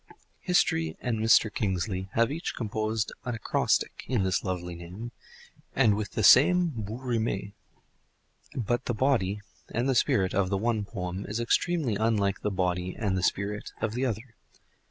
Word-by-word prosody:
History 80 - +1
and 115 -3 -2
Mr. 110 0 +4
Kingsley 95 -2 -2
have 115 +3 +2
each 165 +3 -4
composed 110 -1 -2
an 125 -2 -3
acrostic 115 - 0
on 120 -6 +1
this 95 0 0
lovely 90 -2 -3
name, 90 +8 -8 0.6
and 115 -6 +4
with 105 0 -4
the 110 - -1
same 175 - +7
bouts 115 -2 -6
rimes; 110 -5 -1 1.0
but 120 +1 -1
the 120 - -1
body 105 -6 +1 0.3
(and 120 +3 -1
the 135 - +3
spirit) 95 -6 +2
of 95 -1 +1
the 100 - 0
one 110 0 0
poem 95 -2 -5
is 105 +3 -3
extremely 125 - +1
unlike 105 -3 +1
the - - 0
body 90 -1 -1
(and 100 -4 0
the 95 - 0
spirit) 100 +3 -1
of 110 -1 -1
the 130 +3 0
other. 115 +1 -5
110 Hz, 160 wpm, -28 LUFS, 95-120 Hz, 1.0 s, same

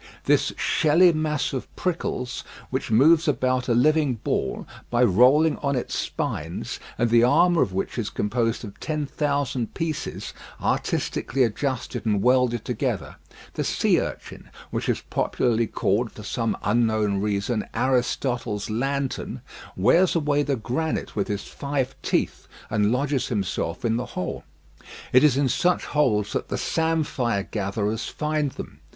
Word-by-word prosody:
This - - +3
shelly 165 +3 +4
mass 155 -2 -1
of 130 - -5
prickles, 130 -8 -2 0.3
which 130 0 -2
moves 155 +9 +5
about 130 -3 +1
a 120 - +2
living 150 +1 +3
ball, 65 - -2 0.2
by 120 +1 +3
rolling 130 - +5
on 140 -1 -1
its 125 - -3
spines, - - -3 0.2
and 120 -1 +1
the 120 0 +6
armour 170 +6 +4
of - - +1
which 95 +5 -3
is 105 - -2
composed 115 +2 -1
of 100 - -11
ten 150 -2 -2
thousand 140 -4 -1
pieces, 160 -2 -4 0.3
artistically 135 0 0
adjusted 125 +2 -2
and 105 -3 +1
welded 125 -2 +3
together - - -2 0.4
the - - -2
sea - - +2
urchin, - - -7 0.2
which - - -2
is - - 0
popularly 115 -2 +1
called, 110 +4 0
for 105 - -11
some 115 +2 -1
unknown 110 -3 +1
reason, 105 +2 -1
"Aristotle's 120 -3 0
lantern," 135 +4 -2 0.4
wears 170 - +4
away 145 -3 +2
the 145 -1 0
granite 130 +8 -3
with 100 - 0
his 100 -1 -3
five 140 -2 -3
teeth, - - -1 0.2
and 105 0 +2
lodges 135 +1 0
himself 95 -3 -2
in 115 0 +2
the 125 - -2
hole. 90 - -3 0.7
It 130 +2 +7
is 145 -4 +5
in 140 -1 +3
such 175 +8 +1
holes 110 -9 +1
that - - -2
the - - -2
samphire 150 -10 0
gatherers 105 +2 -2
find 150 -1 -1
them. - - -9
125 Hz, 145 wpm, -24 LUFS, 110-145 Hz, 0.7 s, It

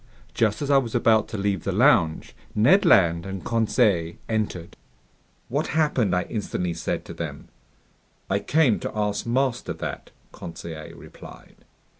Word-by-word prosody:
Just 110 +4 0
as 145 - -1
I 140 - +6
was 120 -3 -5
about 110 -2 +3
to 110 - -6
leave 100 -3 -1
the - - -1
lounge, 80 -1 +2 0.2
Ned 150 - +5
Land 85 -3 +4
and 95 0 -7
Conseil 100 -7 +1
entered. 105 -6 -3 0.7
"What - - -1
happened?" 125 - +2
I 90 - +1
instantly 90 -5 -3
said 80 - -3
to - - -8
them. - - -7 0.8
"I 100 - 0
came 145 -2 +2
to - - -6
ask 105 +1 -1
master 125 0 0
that," - - -6 0.2
Conseil 80 -1 -9
replied. - - -14
105 Hz, 145 wpm, -24 LUFS, 90-120 Hz, 0.8 s, I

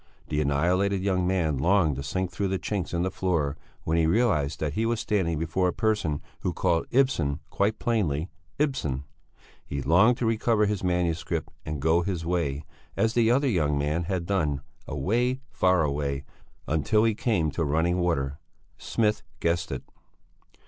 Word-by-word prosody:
The 75 0 0
annihilated 90 +7 +1
young 90 -2 +1
man 80 -7 +1
longed 85 -1 +3
to - - -3
sink 90 +6 -2
through 95 +4 -1
the 95 0 0
chinks 95 -2 -3
in 85 0 0
the 95 - -1
floor 80 -6 0 0.3
when 80 +1 0
he 80 -1 +3
realized 80 - +2
that 75 -2 -2
he 110 - 0
was 115 0 0
standing 95 -8 0
before 80 +4 0
a 90 - 0
person 105 -10 0 0.2
who 90 - -2
called 85 -2 +1
Ibsen 85 - +2
quite 105 +2 +1
plainly 90 - 0 0.3
"Ibsen." 130 - -1 0.6
He 70 - -4
longed 110 +9 +5
to 120 - -1
recover 115 -1 +2
his 105 -2 -1
manuscript, 90 -2 -1 0.2
and 75 -1 -3
go 80 +4 +3
his 85 -2 -3
way, 80 -5 -1 0.3
as 110 0 +2
the 115 -2 +3
other 135 +4 +3
young 75 - +1
man 75 +4 0
had 90 -1 -2
done, 80 -8 0 0.3
away, 125 - 0
far 90 -2 +3
away, 70 -1 -1 0.4
until 80 +8 +2
he 115 -1 +3
came 100 -8 0
to 80 - -1
running 80 +4 +1
water. 75 -5 0 0.4
Smith 105 -2 0 0.2
guessed 85 0 0
it. - - -4
90 Hz, 170 wpm, -27 LUFS, 75-105 Hz, 0.6 s, longed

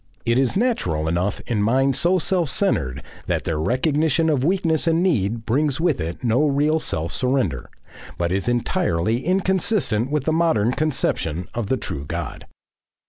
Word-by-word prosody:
It 115 +2 +2
is 135 +5 +1
natural 90 - 0
enough 90 +5 -1
in 110 -4 -1
minds 135 +5 +2
so 180 +2 +3
self 175 -3 +1
centred 75 - +1 0.2
that - - -1
their 80 -2 -2
recognition 150 - +1
of 135 -4 0
weakness 165 -1 +1
and 165 +1 +2
need 115 - 0
brings 140 +5 0
with 160 - +1
it 85 +7 -5
no 125 +6 +2
real 150 +3 +2
self 80 - -2
surrender, 125 - 0 0.5
but 85 0 -1
it - - +1
is 100 +5 -2
entirely 120 - 0
inconsistent 185 - +1
with 150 -2 -1
the 160 - 0
modern 160 -10 +2
conception 120 - -1
of 115 -3 -3
the 130 - 0
true 70 - -5
God. - - -6
130 Hz, 165 wpm, -22 LUFS, 105-160 Hz, 0.5 s, so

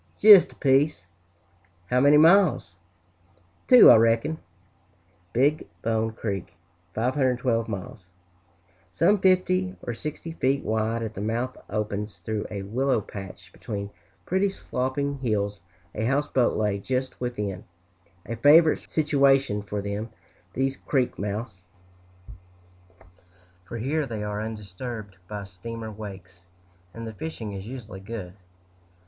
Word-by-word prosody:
"Jist 205 -3 +8
a - - -17
piece!" 140 - +2 0.9
"How 125 - +4
many 145 +3 +6
miles?" 165 - +4 0.9
"Two, 250 -1 +9
I 120 - +8
reck'n." 115 +8 +2 0.9
Big 145 +6 +1 0.2
Bone 110 0 0
Creek 100 -6 -5 0.4
(512 125 -1 +1
miles), 100 0 -7 0.8
some 195 - +3
fifty 185 0 +2
or 120 - -3
sixty 150 +6 -6
feet 135 -3 0
wide 110 +1 -1
at 110 -1 -5
the 100 - -6
mouth, 120 +4 -2
opens 105 -1 -3
through 105 +4 -4
a 100 -2 -5
willow 125 +5 0
patch, 95 -2 -10
between 100 -1 -6 0.3
pretty, 190 +2 +1
sloping 140 -4 -3
hills. 105 -5 -1 0.3
A 110 - -2
houseboat 135 -1 +1
lay 105 -2 0
just 130 +5 -3
within 105 -7 -4 0.6
a 115 +2 -5
favorite 155 +5 +6
situation 135 -7 +2
for 100 0 -5
them, 100 +3 -4 0.4
these 135 +1 -1
creek 130 -4 -1
mouths, 100 -2 -5 2.0
for 115 - -7
here 140 +6 -1
they 110 -3 -4
are 105 0 -3
undisturbed 110 -1 -7
by 105 0 -6
steamer 110 +4 -8
wakes, 95 -4 -10 0.5
and 115 +3 -8
the 110 - -6
fishing 110 -4 -6
is 95 +1 -7
usually 115 -6 -8
good. 95 -3 -7
115 Hz, 120 wpm, -25 LUFS, 105-135 Hz, 2.0 s, Two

